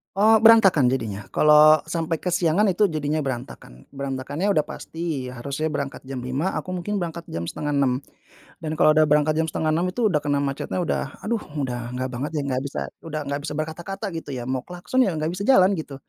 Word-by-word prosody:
Oh, 215 +3 +5
berantakan 195 - +6
jadinya, 110 -6 -3
kalau 150 +1 +6
sampai 165 -1 -2
kesiangan 180 +2 +2
itu 190 +2 +2
jadinya, 155 0 -1
berantakan. 120 - -7
Berantakannya 140 +7 -2
udah 190 - +3
pasti 160 -6 -5
harusnya 140 +5 -3
berangkat 140 -2 -4
jam 135 -1 -6
5.00, 130 +9 -2
aku 185 -1 -4
mungkin 200 +3 -2
berangkat 170 -1 -4
jam 85 0 -4
05.30, 140 -3 0 0.6
dan 155 - -3
kalau 155 - +5
udah 155 0 +5
berangkat 150 +1 +3
jam 160 - +1
5.30 160 +3 0
itu 220 +1 +1
udah 150 - +2
kena 145 -1 +1
macetnya 140 +5 -3
udah, 165 - -1 0.2
aduh, 230 +1 -1 0.2
udah 125 -4 -3
nggak 130 +1 -2
banget, 130 +4 -4
ya, - - -1
nggak 130 -1 -1
bisa, 140 - -5 0.3
udah 155 -1 -3
nggak 140 0 -2
bisa 150 - -4
berkata-kata, 170 +7 -5
gitu, 165 - -6
ya, 125 - -4
mau 130 0 -1
klakson, 180 +8 -3
ya, 195 - 0
nggak 155 +1 -1
bisa 185 +3 -4
jalan, 190 -8 +6
gitu, 145 -3 -7
155 Hz, 195 wpm, -23 LUFS, 135-175 Hz, 0.6 s, berantakan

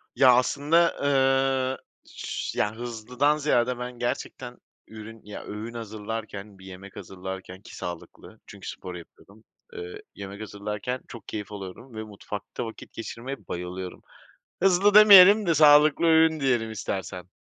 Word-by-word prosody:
Ya, 130 -2 +6
aslında, 150 +7 +2
eee, 135 -1 +2 0.3
ş - - -5
ya, 105 +1 0
hızlıdan 120 +5 -1
ziyade 125 -4 +1
ben 125 0 -7
gerçekten 120 0 -4 0.3
ürün 110 0 -11
ya, 105 - -9
öğün 110 +3 -7
hazırlarken, 110 -2 -7
bir 95 - -14
yemek 95 +1 -11
hazırlarken 95 0 -8
ki - - -13
sağlıklı 85 -1 -9
çünkü - - -9
spor 90 -1 -8
yapıyordum. 100 +5 -15 0.3
Eee, 435 -1 -8
yemek 100 +1 -8
hazırlarken 105 +4 -5
çok 115 -4 -11
keyif 105 -1 -6
alıyorum 100 +5 -9
ve 110 - -5
mutfakta 105 +1 -7
vakit 115 - -10
geçirmeye 125 +4 -6
bayılıyorum. 90 +1 -6 0.6
Hızlı 195 +2 +4
demeyelim 205 0 +9
de 165 - +3
sağlıklı 150 +2 +6
öğün 160 -1 +4
diyelim 120 -5 0
istersen. 95 -3 -5
115 Hz, 135 wpm, -26 LUFS, 100-140 Hz, 0.6 s, demeyelim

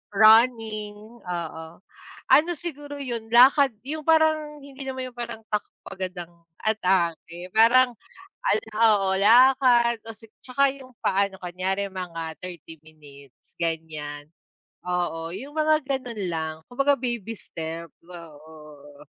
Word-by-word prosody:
Running, 220 0 +3
oo. 170 -2 -5 0.6
Ano 320 +4 +5
siguro 290 -4 -7
yun 235 -5 -5
lakad, 265 +3 +6 0.2
yung 310 +2 -4
parang 310 -1 +2
hindi 275 -1 -12
naman 260 -1 -5
yung - - -27
parang 230 -2 -7
takbo 210 -1 -5
agad 185 -1 -4
ang 175 0 -8 0.3
atake. 180 -4 -1
Parang, 240 +3 +5 0.5
al - - +3
oo 210 -3 +3
lakad 240 +1 +5
o 225 - -7
si 225 - -16 0.2
tsaka 270 +1 +1
yung 260 -2 -14
paano 195 0 +1
kunyari 190 +3 -2
mga 165 -4 -6
30 170 -3 -10
minutes 145 -4 -18
ganyan, 155 -3 -4 0.5
oo. 175 -2 -2
Yung 265 +11 -8
mga 310 0 +3
ganun 250 -5 -4
lang, 160 -2 -3
kumbaga 275 +2 +1
baby 235 -3 -4
step, 165 +1 -7 0.2
oo. 150 -3 -14
215 Hz, 120 wpm, -25 LUFS, 170-255 Hz, 0.6 s, lakad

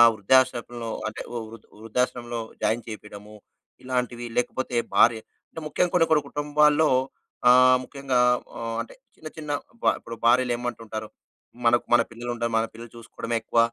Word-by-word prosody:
వృద్ధాశ్రమంలో 120 +1 +1 0.2
అంటే 110 - -5
వృ 115 -1 -6 0.2
వృద్ధాశ్రమంలో 120 +1 -2 0.2
జాయిన్ 115 +2 +1
చేపీడము, 105 -1 -10 0.5
ఇలాంటివి 125 -2 -2
లేకపోతే 125 0 -1 0.2
భార్య 115 -1 +5 0.3
అంటే 160 - -9
ముఖ్యంగ 175 +3 0
కొన్ని 170 -2 +4
కొన్ని 150 -2 +4
కుటుంబాల్లో 150 +1 +3 0.6
ఆ - - +9
ఆహ్, 130 0 +6
ముఖ్యంగా 135 -1 -2 0.4
ఆహ్, 115 -1 -4
అంటే 115 - -7 0.2
చిన్న 155 - -9
చిన్న 155 -2 -7 0.3
బ - - -8
ఇప్పుడు 115 0 -9
భార్యలేమంటుంటారు 120 -3 0 0.6
"మనకు 120 +1 +4
మన 120 - +6
పిల్లలుంటారు. 120 0 -4
మన 110 - +1
పిల్లలు 115 +1 -10
చూసుకోడమే 115 0 -5
ఎక్కువ. 115 - -1
120 Hz, 135 wpm, -25 LUFS, 115-130 Hz, 0.6 s, ఆ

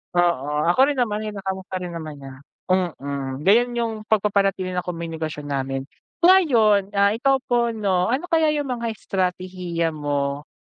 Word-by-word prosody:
Oo, 150 -4 +1
ako 180 - -3
rin 290 - 0
naman 215 -4 0
kinakamusta 195 -3 -5
rin 175 - -5
naman 160 -3 -6
niya, 135 -1 -10 0.4
mm, 140 -6 -2
ganun 235 +7 +4
yung 230 -1 -1
pagpapanatili 195 -3 +1
ng 180 -1 -3
komunikasyon 160 -3 -5
namin. 135 -1 -2 0.4
Ngayon, 235 - +5
ah, 200 0 +4
ikaw 270 +5 +2
po 240 -2 +1
'no 190 -4 +1
ano 260 +7 0
kaya 320 -1 +4
yung 290 -3 -2
mga 235 -1 -3
estratehiya 180 -3 -2
mo, 145 -1 -2
185 Hz, 145 wpm, -23 LUFS, 155-220 Hz, 0.4 s, Ngayon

